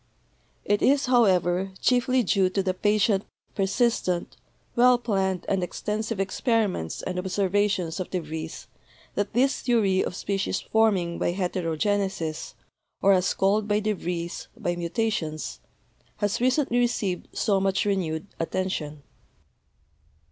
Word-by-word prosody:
It 205 0 +1
is, 280 +1 +4
however, 190 -6 +3
chiefly 250 0 +2
due 195 -4 +2
to 195 +1 -1
the 185 -1 0
patient, 205 +1 +2 0.3
persistent, 195 -3 0 0.4
well 250 +1 +6
planned 195 -6 -1
and 195 -1 +1
ex 180 - -4
tensive 215 +1 -2
experiments 195 - 0
and 180 0 -3
observations 190 -1 0
of 185 - -4
de 185 - -1
Vries 160 0 -6 0.5
that 205 0 -2
this 265 +4 +2
theory 205 -6 +2
of - - -4
species 195 +1 -1
forming 195 -6 +1
by 175 - 0
heterogenesis, 180 -1 -1 0.5
or 195 - +6
as 185 -1 +2
called 205 +2 +2
by 210 0 +2
de 215 0 0
Vries, 175 -2 -4
by 175 -6 -1
mutations, 175 -3 -2 0.6
has 205 +3 -1
recently 255 -1 +2
received 225 -7 0
so 200 -2 +2
much 195 +1 +1
renewed 175 -5 -1
attention. 165 -4 -3
195 Hz, 125 wpm, -26 LUFS, 180-215 Hz, 0.6 s, well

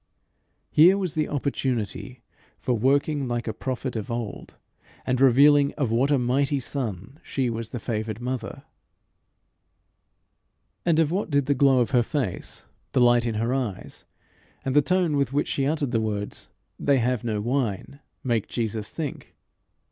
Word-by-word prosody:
Here 175 +6 +6
was 185 -6 -2
the 155 -1 -1
opportunity 130 -6 -3 0.3
for 125 - -1
working 140 +4 +1
like 120 -1 -2
a 110 - -1
prophet 130 +1 -4
of 110 -2 -4
old, 115 -3 -5 0.5
and 130 0 0
revealing 140 +2 +6
of 135 -7 -1
what 125 +5 +2
a 145 - +4
mighty 135 +3 +1
son 125 - -5
she 130 -3 -1
was 115 0 -4
the 120 - -5
favoured 110 -1 -3
mother. 125 -2 -4 2.2
And 165 -2 +4
of 160 -1 +3
what 190 +2 -1
did 140 -2 +2
the 140 - +2
glow 135 -1 +4
of 120 - 0
her 125 -3 +4
face, 125 - -3 0.3
the - - +3
light 120 -1 +4
in 115 - -2
her 115 +3 0
eyes, 125 -8 -4 0.6
and 135 0 -1
the 145 - +7
tone 175 -1 +1
with 140 -2 0
which 145 - 0
she 135 -1 0
uttered 145 -4 -1
the 115 -2 +1
words, 105 -2 -3 0.3
"They 140 -1 +3
have 125 -1 0
no 110 -3 -1
wine," 120 +2 -2 0.2
make 115 -5 0
Jesus 110 -2 -3
think? 155 -4 -6
130 Hz, 160 wpm, -25 LUFS, 115-140 Hz, 2.2 s, the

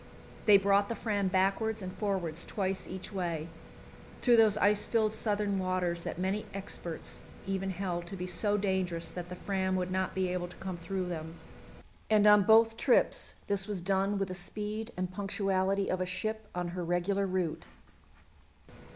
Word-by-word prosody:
They 205 -1 +9
brought 200 +1 +3
the 230 - -2
Fram 205 -3 -1
backwards 195 +4 +1
and 185 -2 -6
forwards, 185 -6 -2
twice 190 -2 -2
each 190 +2 -7
way, 170 -4 -2 0.7
through 240 -2 +5
those 215 -2 +5
ice 205 0 +4
filled 220 -2 +1
southern 205 -2 0
waters 185 -2 0
that - - -5
many 190 +3 -1
experts 175 -4 -4 0.2
even 195 0 -2
held 180 -2 -3
to 195 - -6
be 180 -1 -4
so 205 +4 +1
dangerous 185 -4 -1
that 175 +1 -7
the 180 - -6
Fram 190 0 -1
would 185 0 -1
not 190 0 -1
be 190 -1 0
able 180 -1 -2
to 175 - -13
come 190 -1 -5
through 185 +2 -3
them, 165 -2 -5 0.7
and 210 -1 +5
on 210 0 +8
both 225 +1 +5
trips - - +3
this 195 -1 +1
was 205 -3 -1
done 195 +2 +1
with 195 -1 -1
the - - -4
speed 210 +5 -2
and 185 0 -3
punctuality 195 0 0
of 185 - -1
a 185 - -1
ship 215 +4 -2
on 175 -1 -2
her 180 0 -4
regular 180 +3 0
route. 180 -4 -2
190 Hz, 175 wpm, -31 LUFS, 180-205 Hz, 0.7 s, They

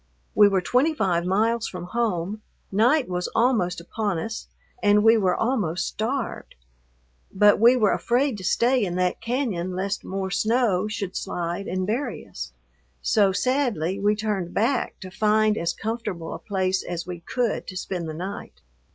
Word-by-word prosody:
We 210 -1 +7
were 195 -2 +2
twenty 265 - +2
five 175 - +1
miles 220 +4 +1
from 180 -2 -6
home, 210 -1 -2 0.3
night 245 +8 +3
was 180 0 -2
almost 220 -8 +2
upon 200 +2 -2
us, 220 +7 -5 0.3
and 205 0 +4
we 225 +1 +7
were 190 -5 +2
almost 200 -9 0
starved. 245 +4 -3 0.8
But 205 +1 +5
we 235 +3 +7
were 215 -5 +3
afraid 245 -1 +1
to - - -8
stay 240 +5 +2
in 175 -3 -2
that 180 0 0
cañon 220 -8 -2
lest 195 +2 -2
more 190 0 -3
snow 215 -4 +2
should 200 -3 -4
slide 175 +3 -3
and 185 0 -1
bury 235 +3 -2
us, - - -7 0.5
so 200 -3 +3
sadly 200 - 0
we 205 +1 +2
turned 205 -5 -2
back 240 +4 0
to 185 - -8
find 215 +1 +2
as 170 -4 0
comfortable 215 -7 -4
a - - -6
place 190 -2 0
as 175 -1 -5
we 180 -1 -6
could 235 +6 -2
to 185 - -6
spend 180 -3 -4
the 155 - -5
night. 190 +5 -7
205 Hz, 165 wpm, -24 LUFS, 180-230 Hz, 0.8 s, We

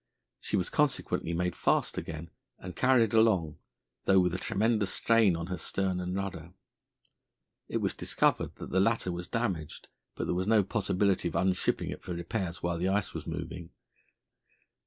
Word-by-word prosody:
She - - -1
was 90 - -1
consequently 145 - 0
made 90 +1 -1
fast - - +1
again 80 +1 -6 0.3
and 90 -1 -8
carried 120 -3 +3
along, 105 -9 +3 0.5
though 95 -1 +5
with 90 -1 +2
a 90 - -2
tremendous 105 0 +1
strain 115 -6 +3
on 85 0 -4
her 90 -1 -4
stern 95 +1 -1
and 90 +1 -3
rudder. 90 -4 -5 1.2
It - - -1
was - - 0
discovered - - +1
that - - -8
the 95 - +2
latter 105 -2 +2
was 85 0 -5
damaged, 95 -10 -3 0.3
but - - -3
there - - 0
was 90 +2 -1
no 110 -2 +5
possibility 100 -2 +1
of 85 - -5
unshipping 95 -1 +1
it - - -7
for 90 - -5
repairs 85 0 -4
while 85 -1 -1
the 90 +2 +1
ice 100 0 0
was - - -6
moving. 85 -2 -5
95 Hz, 170 wpm, -30 LUFS, 85-105 Hz, 1.2 s, though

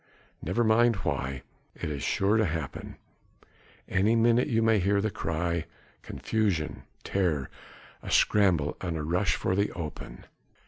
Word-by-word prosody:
"Never 95 +9 0
mind 115 +1 +4
why. 65 0 -2 0.3
It - - -4
is 70 -2 -4
sure 100 +2 +1
to 110 - +3
happen. 80 -3 -5 0.9
Any 100 +4 +2
minute 115 +2 +3
you 115 -1 +1
may 110 -2 +4
hear 100 +2 +2
the 110 +1 -1
cry... 85 0 -2 0.4
confusion, 100 -9 -2 0.2
terror... 85 -9 -1 0.5
a - - -8
scramble 90 -8 +3
and 85 -3 -3
a 75 - -3
rush 90 +5 +1
for 95 - -1
the 100 +1 +1
open." 80 -3 -7
95 Hz, 140 wpm, -28 LUFS, 80-110 Hz, 0.9 s, mind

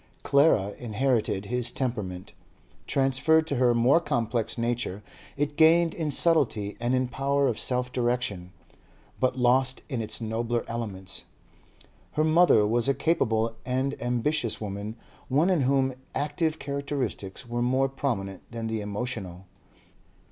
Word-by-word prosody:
Clara 140 -9 +3
inherited 115 -3 0
his 125 +2 -1
temperament; 105 -8 -4 0.5
transferred 140 +4 +3
to 145 -4 -2
her 120 -1 +3
more 125 +7 +5
complex 120 -8 -1
nature, 115 -4 -2 0.3
it 145 0 -1
gained 165 +1 +5
in 160 -3 -2
subtlety 135 - +1
and 120 +2 +1
in 130 0 +1
power 140 +2 +1
of 115 -4 -1
self 125 0 0
direction, 120 -7 -1 0.7
but 130 0 +1
lost 130 +1 +2
in 125 -5 -2
its 110 -1 -1
nobler 115 +1 -2
elements. 100 -5 -5 0.9
Her 155 - +2
mother 160 -8 +5
was 120 +4 +1
a 140 - +2
capable 115 -7 +1
and 130 +2 -1
ambitious 120 +1 -1
woman, 105 +1 -5 0.3
one 150 +8 +3
in 175 -5 +2
whom 135 0 +2 0.2
active 155 +2 -1
characteristics 140 -7 -4
were 120 0 -2
more 130 +2 +2
prominent 110 -9 -3
than 115 -1 -5
the 110 -1 -2
emotional. 100 -4 -5
125 Hz, 135 wpm, -27 LUFS, 110-140 Hz, 0.9 s, more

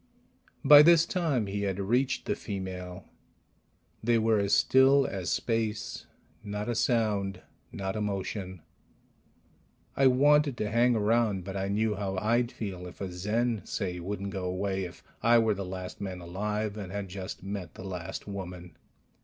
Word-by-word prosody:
By 145 0 +10
this 165 +1 +6
time 160 - 0
he 100 +1 -3
had 100 -1 -2
reached 125 +7 0
the - - 0
female. 95 -2 -6 1.0
They 120 +1 +3
were 110 -1 +3
as 100 0 0
still 135 +1 +5
as 95 -6 -3
space, 110 -3 -2 0.4
not 105 0 -4
a 120 - 0
sound, 105 -5 0 0.3
not 95 0 -4
a 110 - -2
motion. 95 -3 -4 1.3
I 135 - +5
wanted 145 +1 +4
to 105 -2 -2
hang 120 +1 +4
around, 110 -3 +1
but 95 +1 -6
I 95 0 -1
knew 105 +2 +1
how 95 -2 -3
I'd 120 +4 +1
feel 95 -7 -6
if 90 - -12
a 95 -2 -4
Zen, 110 +5 -1
say, 90 -4 -3
wouldn't 100 +2 -4
go 95 -2 -4
away 95 +1 -2
if 85 - -11 0.2
I 120 +1 +5
were 110 -2 +3
the 100 0 -4
last 90 +1 -7
man 95 -2 -4
alive 105 +4 -3
and 95 -3 -6
had 100 0 -4
just 95 0 -7
met 100 -2 -6
the - - -9
last 95 0 -6
woman. 90 -3 -7
100 Hz, 160 wpm, -29 LUFS, 95-115 Hz, 1.3 s, By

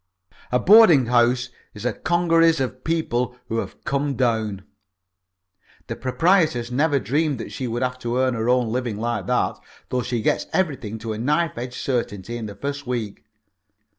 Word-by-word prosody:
A 125 - +3
boarding 180 - +7
house 120 +1 +2 0.3
is 105 +2 -8
a 125 - +1
congeries 165 -2 +2
of 130 -1 -3
people 125 -7 -1
who 115 - -1
have - - -7
come 140 -1 -1
down. 110 -6 0 1.2
The - - -5
proprietoress 150 -4 +1
never 145 +3 +2
dreamed 140 +5 0
that - - -7
she 130 - -4
would 120 +2 -2
have 125 0 -2
to 120 0 -2
earn 130 0 +2
her 115 0 -1
own 125 -2 +2
living 120 -3 -2
like 115 -3 -2
that - - 0 0.3
though 125 - 0
she 120 -2 -2
gets - - 0
everything 135 - -1
to 110 0 -5
a 110 - -6
knife 150 +6 0
edge 120 +1 -6
certainty 115 -4 -3
in 115 -2 -5
the 100 - -9
first 140 +4 -5
week. 115 -5 -4
125 Hz, 170 wpm, -23 LUFS, 115-145 Hz, 1.2 s, boarding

